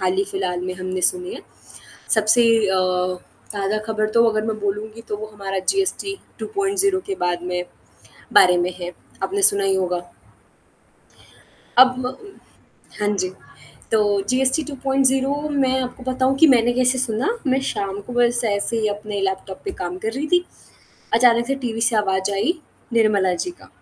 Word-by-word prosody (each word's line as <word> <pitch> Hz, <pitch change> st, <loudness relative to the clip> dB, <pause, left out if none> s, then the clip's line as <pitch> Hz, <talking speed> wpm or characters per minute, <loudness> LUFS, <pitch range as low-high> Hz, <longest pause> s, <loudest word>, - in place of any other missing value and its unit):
हाल 185 Hz, -1 st, +1 dB
ही 195 Hz, -, +2 dB
फिलहाल 185 Hz, -2 st, -2 dB
में 185 Hz, 0 st, -3 dB
हमने 185 Hz, 0 st, -4 dB
सुनी 360 Hz, -, 0 dB
हैं। -, -, -9 dB, 0.7 s
सबसे 220 Hz, +2 st, +4 dB, 0.3 s
अ, 190 Hz, -1 st, +2 dB, 0.7 s
ताज़ा 205 Hz, +1 st, -1 dB
खबर 215 Hz, -1 st, 0 dB
तो 230 Hz, +1 st, +4 dB
अगर 215 Hz, -1 st, 0 dB
मैं 220 Hz, -1 st, -2 dB
बोलूँगी 210 Hz, +2 st, -3 dB
तो 210 Hz, -, -2 dB
वो 215 Hz, +1 st, -6 dB
हमारा 195 Hz, -1 st, -3 dB
जीएसटी 390 Hz, 0 st, -1 dB, 0.2 s
2.0 395 Hz, -2 st, 0 dB
के 395 Hz, -, -2 dB
बाद 175 Hz, 0 st, -1 dB
में 180 Hz, 0 st, -1 dB, 0.7 s
बारे 180 Hz, -1 st, +7 dB
में 175 Hz, +1 st, 0 dB
है 175 Hz, 0 st, -5 dB, 0.3 s
आपने 400 Hz, +1 st, -1 dB
सुना 200 Hz, -, +5 dB
ही 195 Hz, 0 st, +2 dB
होगा? 180 Hz, -2 st, -1 dB, 1.8 s
अब 255 Hz, 0 st, +8 dB
म 250 Hz, -, -5 dB, 0.8 s
हाँ 210 Hz, -, 0 dB
जी। 185 Hz, -1 st, -1 dB, 0.6 s
तो 220 Hz, -, +4 dB, 0.3 s
जीएसटी 265 Hz, +4 st, +2 dB
2.0 270 Hz, -1 st, +1 dB, 0.2 s
मैं 265 Hz, -2 st, +2 dB
आपको 255 Hz, 0 st, -6 dB
बताऊँ 260 Hz, +1 st, +1 dB
कि 320 Hz, +3 st, +7 dB
मैंने 240 Hz, -3 st, +4 dB
कैसे 255 Hz, +1 st, +2 dB
सुना, 235 Hz, 0 st, 0 dB, 0.2 s
मैं 265 Hz, 0 st, +3 dB
शाम 200 Hz, -6 st, -3 dB
को 245 Hz, -, -6 dB
बस 240 Hz, 0 st, +2 dB
ऐसे 205 Hz, +2 st, 0 dB
ही 215 Hz, -, +1 dB
अपने 205 Hz, 0 st, -4 dB
लैपटॉप 190 Hz, 0 st, -3 dB
पे 390 Hz, -, -2 dB
काम 180 Hz, -, -5 dB
कर 220 Hz, +3 st, -2 dB
रही 280 Hz, +5 st, -3 dB
थी। 355 Hz, +2 st, +3 dB, 0.7 s
अचानक 235 Hz, 0 st, +4 dB
से 275 Hz, -, 0 dB
टीवी 225 Hz, -2 st, -2 dB
से 230 Hz, 0 st, +2 dB
आवाज 190 Hz, -2 st, +1 dB
आई 200 Hz, +12 st, +1 dB, 0.4 s
निर्मला 210 Hz, -5 st, +3 dB
जी 360 Hz, -, -3 dB
का -, -, -16 dB
225 Hz, 165 wpm, -21 LUFS, 195-265 Hz, 1.8 s, अब